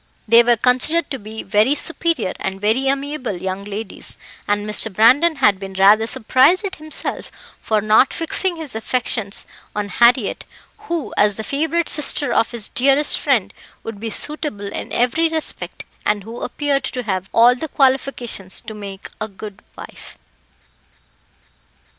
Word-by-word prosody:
They 230 +2 +7
were 240 0 +2
considered 255 +7 +1
to 270 - -3
be 215 +2 -8
very 210 +8 +2
superior 330 - -1
and 195 0 -4
very 220 +6 +1
amiable 275 -6 -2
young 190 +2 -5
ladies, 210 +2 -7 0.3
and 205 0 0
Mr. 210 +1 +4
Brandon 260 - +4
had 210 -8 +2
been 195 -1 -8
rather 205 +4 +5
surprised 265 - +3
at 380 -1 -5
himself 310 0 -1 0.3
for 215 -1 0
not 215 +5 +4
fixing 345 +2 -1
his 320 -4 -7
affections 220 -2 -1 0.3
on 205 -1 -3
Harriett, 235 +2 +2 0.4
who, 335 -4 -3
as 205 -1 +3
the 220 - -5
favourite 320 +6 -1
sister 295 -1 +3
of 225 - +2
his 235 -3 -2
dearest 275 +3 +2
friend, - - 0 0.3
would 225 -3 -7
be 225 +1 -4
suitable 215 -6 -3
in - - -6
every 250 +8 +1
respect, 320 -1 -2 0.2
and 205 -2 0
who 230 +3 -9
appeared 285 -2 -1
to 250 - -4
have 190 -3 -3
all 235 +2 +5
the 290 +6 -5
qualifications 260 -8 0
to 220 - -9
make 200 -2 -9
a 215 - -2
good 205 0 -11 0.2
wife. - - -11
235 Hz, 155 wpm, -19 LUFS, 210-285 Hz, 0.4 s, They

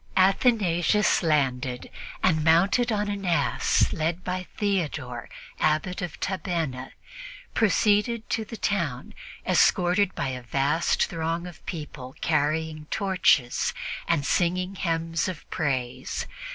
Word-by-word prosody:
Athanasius 195 -1 +3
landed 135 -6 0 0.3
and, 155 -4 +3
mounted 195 +10 +4
on 210 -1 0
an 200 -1 -3
ass 175 -3 +2
led 165 +3 -1
by 180 0 -3
Theodore, 150 - -2 0.3
Abbot 155 +4 +1
of 175 -3 -5
Tabenna, 165 -9 -3 0.6
proceeded 220 +2 +2
to 225 - 0
the 225 +1 -8
town 165 -13 -2 0.3
escorted 180 +2 +3
by 135 - -1
a 130 -1 -5
vast 140 +7 +1
throng 165 +1 -3
of 175 -3 -11
people 150 -6 -7
carrying 155 0 0
torches 180 - +2 0.3
and 160 -4 +1
singing 180 +3 +1
hymns 165 -3 -1
of 185 -5 -6
praise. 130 -4 -2
170 Hz, 110 wpm, -26 LUFS, 150-190 Hz, 0.6 s, mounted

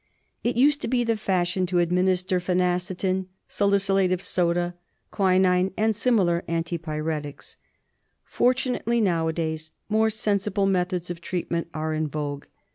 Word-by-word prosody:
It 240 - 0
used 280 +4 +4
to - - -2
be 245 0 +1
the 230 -1 +1
fashion 185 -3 0
to 180 0 0
administer 180 +2 +2
phenacetin, 180 +1 0 0.2
salicylate 195 -2 +2
of 185 - +1
soda, 175 -1 0 0.4
quinine, 185 -1 +3
and 220 0 +2
similar 195 -7 +2
anti 165 +1 -2
pyretics. 155 -2 -5 0.7
Fortunately 245 -2 +1
now 170 -6 +1
^ - - -11
days 160 -1 -3 0.2
more 220 +1 +3
sensible 205 -2 0
methods 180 -2 0
of 170 -1 -7
treatment 170 -1 -3
are 155 0 -2
in 155 0 -1
vogue. 145 -1 -4
180 Hz, 135 wpm, -25 LUFS, 170-200 Hz, 0.7 s, used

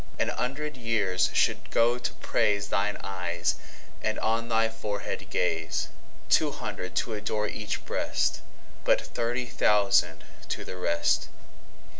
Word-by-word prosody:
An - - +1
hundred 145 +3 -2
years 100 -6 +2
should - - +2
go 120 +2 +3
to 120 - -2
praiseThine 100 0 +1
Eyes, 90 -2 -1 0.5
and 110 - 0
on 115 +1 0
thy 115 0 +3
Forehead 105 -2 -4
Gaze.Two 80 0 0
hundred 90 0 -5
to 115 - 0
adore 105 0 -1
each 105 0 -4
Breast:But - - -1
thirty 120 +1 -2
thousand 105 -4 +3 0.3
to - - -3
the - - -6
rest. 85 -2 +2
105 Hz, 115 wpm, -28 LUFS, 95-115 Hz, 0.5 s, go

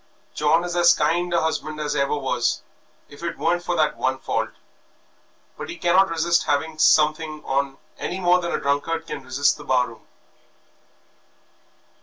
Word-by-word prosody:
John 150 +3 +2
is 175 -1 -4
as 175 0 +5
kind 170 +4 0
a 170 -2 +2
husband 155 -1 -2
as 150 -1 -2
ever 140 +1 +1
was 130 -3 -1 0.4
if 145 - -14
it 170 0 -4
weren't 175 +2 +1
for 175 0 -1
that 155 -2 +1
one 130 0 0
fault; - - -2 1.1
but - - -7
he 345 - -6
cannot 185 +3 +3
resist 170 +1 +1
having 155 +2 -1
something 155 0 +3
on 135 0 -1 0.2
any 185 - -3
more 180 0 +3
than 170 - -3
a - - -1
drunkard 160 +4 -1
can 150 -4 -6
resist 135 +2 +1
the 150 - -10
bar 125 -3 +1
room." 110 -2 -16
155 Hz, 165 wpm, -23 LUFS, 140-170 Hz, 1.1 s, as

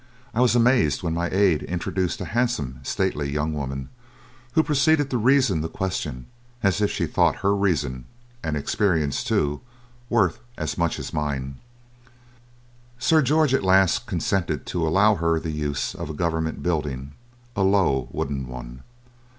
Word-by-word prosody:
I 120 - +1
was 125 -1 +4
amazed 120 - +3
when 85 -2 -1
my 85 +1 -1
aide 95 -5 +3
introduced 90 +1 -2
a - - -3
handsome, 95 - 0
stately 70 +1 -1
young 75 +2 -1
woman, 70 -2 -4 0.6
who 160 - +4
proceeded 150 -1 +2
to 125 - +1
reason 130 - +3
the 80 - -3
question 75 -9 -3 0.4
as 100 +1 +2
if 105 - +3
she - - -1
thought - - +2
her 100 +1 +4
reason, 80 -11 0 0.4
and 80 -2 -2
experience 80 -2 0
too, 75 0 0 0.5
worth 100 -8 +2 0.2
as - - -3
much 85 -2 0
as - - -6
mine." 70 -3 -3 1.4
Sir 155 +6 +4
George 150 0 +3
at 135 - +3
last 95 +4 +3
consented 85 - -1
to 85 -2 -1
allow 100 +7 +4
her 85 -1 +1
the 80 - -4
use 75 0 -2
of 85 -4 -6
a 80 - -5
Government 80 -1 -2
building, 75 -6 -2 0.4
a 100 - 0
low 95 -10 +2
wooden 65 -2 -3
one. 60 0 -9
85 Hz, 155 wpm, -24 LUFS, 75-100 Hz, 1.4 s, was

